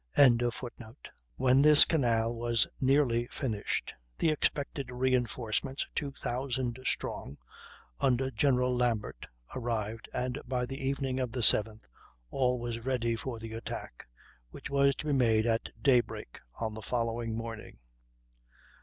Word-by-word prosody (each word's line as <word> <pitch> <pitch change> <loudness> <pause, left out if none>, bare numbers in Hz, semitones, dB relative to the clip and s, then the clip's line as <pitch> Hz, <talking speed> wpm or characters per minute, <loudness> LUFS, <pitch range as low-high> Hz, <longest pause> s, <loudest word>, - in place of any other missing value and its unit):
] - - -42 1.2
When 130 +1 +4
this 150 0 +8
canal 115 -7 +1
was 115 -1 +1
nearly 130 -3 +2
finished 110 -8 -3 0.2
the 160 - +2
expected 140 -3 -1
reinforcements, 125 +1 -1
two 145 -2 -2
thousand 125 -1 -3
strong, 70 - -3 0.6
under 130 +1 +1
General 125 +1 +2
Lambert, 120 -4 -1 0.3
arrived, 115 -3 -3
and 125 +3 -3
by 125 -1 -1
the 135 +2 -7
evening 135 -1 -1
of 125 -3 -2
the 125 +1 -3
7th 110 0 +3 0.5
all 125 -2 +1
was 120 -1 -4
ready 120 -1 -1
for 120 +1 -5
the 110 0 -8
attack, 115 - -7 0.4
which - - -9
was 140 0 +3
to - - -7
be 150 - +1
made 115 -4 +3
at 115 -1 0
daybreak 120 - +1 0.2
on 110 -1 -3
the 110 - -7
following 115 -1 -2
morning. 115 -1 -7
125 Hz, 130 wpm, -30 LUFS, 115-130 Hz, 1.2 s, this